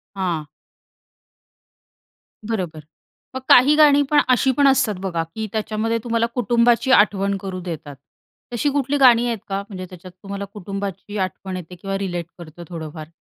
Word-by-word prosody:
हां. 175 Hz, -5 st, -2 dB, 2.0 s
बरोबर. 180 Hz, -8 st, -3 dB, 0.6 s
मग -, -, -2 dB
काही 270 Hz, +4 st, +7 dB
गाणी 290 Hz, -2 st, +6 dB
पण 295 Hz, -1 st, +5 dB
अशी 255 Hz, +1 st, +3 dB
पण 285 Hz, -, +5 dB
असतात 250 Hz, -5 st, +2 dB
बघा, 180 Hz, -4 st, -2 dB
की 220 Hz, 0 st, -3 dB
त्याच्यामध्ये 220 Hz, +1 st, -1 dB
तुम्हाला 230 Hz, -1 st, +1 dB
कुटुंबाची 240 Hz, +2 st, +2 dB
आठवण 200 Hz, -3 st, +3 dB
करू 185 Hz, -1 st, -5 dB
देतात. 160 Hz, -5 st, -7 dB, 0.6 s
तशी 245 Hz, +5 st, 0 dB
कुठली 280 Hz, 0 st, 0 dB
गाणी 245 Hz, -3 st, +6 dB
आहेत 235 Hz, -2 st, -1 dB
का? 195 Hz, 0 st, -2 dB
म्हणजे 185 Hz, -2 st, -7 dB
त्याच्यात 180 Hz, 0 st, -12 dB
तुम्हाला 200 Hz, 0 st, -5 dB
कुटुंबाची 200 Hz, 0 st, -6 dB
आठवण 190 Hz, 0 st, -3 dB
येते 180 Hz, 0 st, -8 dB
किंवा 195 Hz, +2 st, -4 dB
रिलेट 175 Hz, -4 st, -3 dB
करतं 170 Hz, 0 st, -11 dB
थोडंफार? 160 Hz, -2 st, -7 dB
200 Hz, 145 wpm, -21 LUFS, 180-235 Hz, 2.0 s, काही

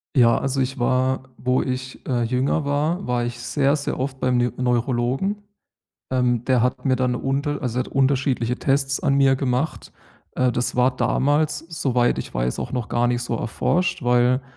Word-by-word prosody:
Ja, 115 Hz, -3 st, +5 dB
also, 135 Hz, 0 st, -1 dB
ich 135 Hz, +2 st, -2 dB
war, 130 Hz, +1 st, +1 dB
wo 125 Hz, 0 st, +1 dB
ich, 130 Hz, 0 st, -5 dB
äh, 125 Hz, -3 st, 0 dB
jünger 130 Hz, +5 st, 0 dB
war 150 Hz, +6 st, -1 dB
war 120 Hz, -1 st, 0 dB
ich 120 Hz, 0 st, -5 dB
sehr, 140 Hz, +3 st, +1 dB
sehr 145 Hz, -, -3 dB
oft 135 Hz, 0 st, -3 dB
beim 125 Hz, -1 st, +1 dB
Nü 120 Hz, 0 st, +1 dB
Neurologen. 125 Hz, -, 0 dB, 0.7 s
Ähm, 125 Hz, -2 st, +1 dB
der 130 Hz, -2 st, +2 dB
hat 125 Hz, +2 st, -1 dB
mir 130 Hz, -2 st, +3 dB
dann 130 Hz, -1 st, 0 dB
'ne 125 Hz, -, -2 dB
unter 140 Hz, +2 st, -2 dB
also, 125 Hz, -2 st, -2 dB
der -, -, -1 dB
hat -, -, -10 dB
unterschiedliche 130 Hz, -3 st, +1 dB
Tests 135 Hz, -1 st, 0 dB
an 135 Hz, -, +2 dB
mir 135 Hz, -1 st, +4 dB
gemacht. 130 Hz, +3 st, -2 dB, 0.4 s
Äh, 125 Hz, -1 st, +1 dB
das 125 Hz, +1 st, -2 dB
war 125 Hz, +1 st, +3 dB
damals, 145 Hz, +4 st, +1 dB
soweit 125 Hz, -6 st, +1 dB
ich -, -, -6 dB
weiß -, -, -1 dB
auch -, -, -4 dB
noch 125 Hz, -5 st, -3 dB
gar 120 Hz, 0 st, +2 dB
nicht 120 Hz, 0 st, 0 dB
so 120 Hz, -, -3 dB
erforscht, 180 Hz, +9 st, -1 dB
weil 125 Hz, +1 st, +3 dB
130 Hz, 190 wpm, -22 LUFS, 125-135 Hz, 0.7 s, Ja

